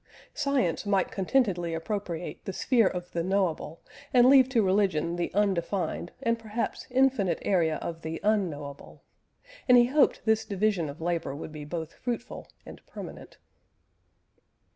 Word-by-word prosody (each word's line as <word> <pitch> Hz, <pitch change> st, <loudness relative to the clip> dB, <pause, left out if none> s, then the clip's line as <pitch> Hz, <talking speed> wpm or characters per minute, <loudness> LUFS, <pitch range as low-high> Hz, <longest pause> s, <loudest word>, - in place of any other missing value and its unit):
Science 280 Hz, -, 0 dB
might 200 Hz, -3 st, +1 dB
contentedly 190 Hz, -5 st, 0 dB
appropriate 175 Hz, -1 st, -4 dB
the -, -, -3 dB
sphere 235 Hz, -3 st, +3 dB
of 180 Hz, -1 st, -4 dB
the 170 Hz, -, -1 dB
knowable, 180 Hz, -4 st, -1 dB, 0.3 s
and 245 Hz, -1 st, +6 dB
leave 265 Hz, -2 st, +6 dB
to 235 Hz, -4 st, +2 dB
religion 185 Hz, -4 st, +1 dB
the 175 Hz, 0 st, -2 dB
undefined 185 Hz, -3 st, 0 dB
and 230 Hz, -1 st, +1 dB
perhaps 225 Hz, +1 st, -4 dB
infinite 250 Hz, -9 st, +2 dB
area 165 Hz, -5 st, +2 dB
of 165 Hz, -1 st, -5 dB
the 160 Hz, 0 st, -5 dB
unknowable; 160 Hz, -10 st, -2 dB, 0.7 s
and 250 Hz, -, +8 dB
he 240 Hz, -, +7 dB
hoped 280 Hz, +3 st, +2 dB
this 220 Hz, 0 st, +3 dB
division 200 Hz, -6 st, 0 dB
of 145 Hz, +3 st, -9 dB
labour 165 Hz, -4 st, -2 dB
would 155 Hz, +1 st, -7 dB
be 150 Hz, -1 st, -8 dB
both 160 Hz, +1 st, -5 dB
fruitful 240 Hz, -1 st, -5 dB, 0.2 s
and -, -, -12 dB
permanent. -, -, -10 dB
190 Hz, 140 wpm, -28 LUFS, 165-225 Hz, 0.7 s, and